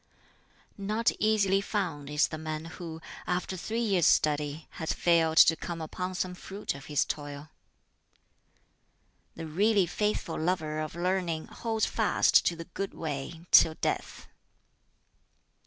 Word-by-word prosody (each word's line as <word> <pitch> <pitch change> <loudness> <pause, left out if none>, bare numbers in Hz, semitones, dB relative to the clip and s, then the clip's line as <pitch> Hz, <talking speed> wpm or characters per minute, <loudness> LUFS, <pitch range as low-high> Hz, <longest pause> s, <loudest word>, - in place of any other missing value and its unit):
"Not 215 +3 +1
easily 200 -3 +3
found 175 -9 -3
is 150 +1 +2
the 155 - -6
man 155 0 -4
who, 165 -1 -8 0.3
after 180 +1 -1
three 220 +6 -3
years' 190 -7 +3
study, 150 +1 +1
has 160 - -1
failed 165 -2 +2
to 165 - +8
come 170 0 -6
upon 180 +3 -4
some 185 0 -2
fruit 195 +3 -5
of 135 -1 -11
his 145 -2 +1
toil. 145 0 -6 1.8
"The 165 - -6
really 200 +5 +3
faithful 210 -1 -2
lover 155 -2 -1
of 155 +1 -4
learning 175 -2 -1
holds 225 -2 -1
fast - - +3
to 170 - +1
the 165 0 -8
Good 195 +3 -5
Way 160 +2 -5
till 160 -1 +7
death. - - -3
170 Hz, 135 wpm, -29 LUFS, 155-190 Hz, 1.8 s, to